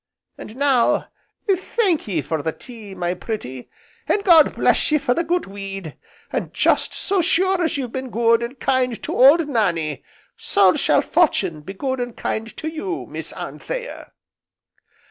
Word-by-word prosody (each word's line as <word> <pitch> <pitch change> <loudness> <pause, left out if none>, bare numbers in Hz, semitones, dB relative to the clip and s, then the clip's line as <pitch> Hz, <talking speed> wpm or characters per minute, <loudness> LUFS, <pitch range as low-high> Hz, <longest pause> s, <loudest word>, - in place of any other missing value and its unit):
And 215 - -10
now 265 -3 +2 0.4
thank 380 - +1
ye 170 -8 -1
for 155 +2 -2
the 160 - -1
tea, 220 -1 -10
my 175 -1 -1
pretty, 175 - -6 0.4
and 405 - +1
God 335 -6 +6
bless 335 - +2
ye 305 - +5
for 275 -4 +1
the 335 - 0
good 350 +2 0
weed, 195 -4 -7 0.4
and - - -3
just - - +2
so 390 -2 0
sure 375 +3 +2
as 320 - 0
you've 255 -4 -4
been 260 0 -5
good, 230 0 +3
and 240 +3 -6
kind 255 -3 0
to - - -3
old 290 +5 +6
Nannie, 170 - -1 0.3
so - - +3
shall - - +3
Fortune 155 -3 +1
be 195 +6 -9
good 260 +4 -2
and 245 -1 -4
kind 225 +1 -4
to 315 - -5
you, 345 +3 -4
Miss - - -5
Anthea." - - -7
250 Hz, 165 wpm, -21 LUFS, 195-320 Hz, 0.4 s, God